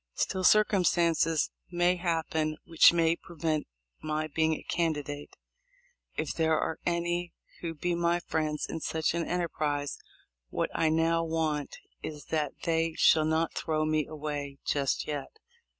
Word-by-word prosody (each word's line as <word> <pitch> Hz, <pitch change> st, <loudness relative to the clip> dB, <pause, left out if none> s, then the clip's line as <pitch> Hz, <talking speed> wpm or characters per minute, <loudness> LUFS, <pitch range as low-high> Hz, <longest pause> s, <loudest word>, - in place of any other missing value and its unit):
Still, 185 Hz, -, -1 dB
circumstances 170 Hz, -6 st, +3 dB, 0.2 s
may 175 Hz, +1 st, +2 dB
happen 160 Hz, -3 st, -1 dB
which 165 Hz, -1 st, +7 dB
may 165 Hz, -1 st, +3 dB
prevent 160 Hz, -3 st, -3 dB, 0.3 s
my 155 Hz, 0 st, -1 dB
being 160 Hz, +1 st, +1 dB
a -, -, -9 dB
candi 160 Hz, -4 st, 0 dB
date. 145 Hz, 0 st, -7 dB, 0.8 s
If -, -, -2 dB
there 160 Hz, -1 st, +2 dB
are 160 Hz, -, -2 dB
any 175 Hz, 0 st, -1 dB, 0.3 s
who 165 Hz, -1 st, -4 dB
be 175 Hz, +4 st, -1 dB
my 170 Hz, 0 st, +2 dB
friends 155 Hz, -3 st, -1 dB
in 165 Hz, -, -4 dB
such 160 Hz, 0 st, -1 dB
an 170 Hz, -1 st, -1 dB
enterprise, 150 Hz, -5 st, -1 dB, 0.5 s
what -, -, -1 dB
I 160 Hz, -, +2 dB
now 165 Hz, +1 st, +2 dB
want 160 Hz, -3 st, -1 dB, 0.2 s
is 150 Hz, -1 st, -7 dB
that 150 Hz, -3 st, 0 dB
they 165 Hz, -1 st, +1 dB
shall 155 Hz, -1 st, +5 dB
not 160 Hz, +1 st, +1 dB
throw 155 Hz, -2 st, -1 dB
me 155 Hz, -1 st, +1 dB
away 145 Hz, -2 st, -5 dB
just 140 Hz, -2 st, 0 dB
yet." 150 Hz, -, -5 dB
160 Hz, 145 wpm, -29 LUFS, 155-170 Hz, 0.8 s, which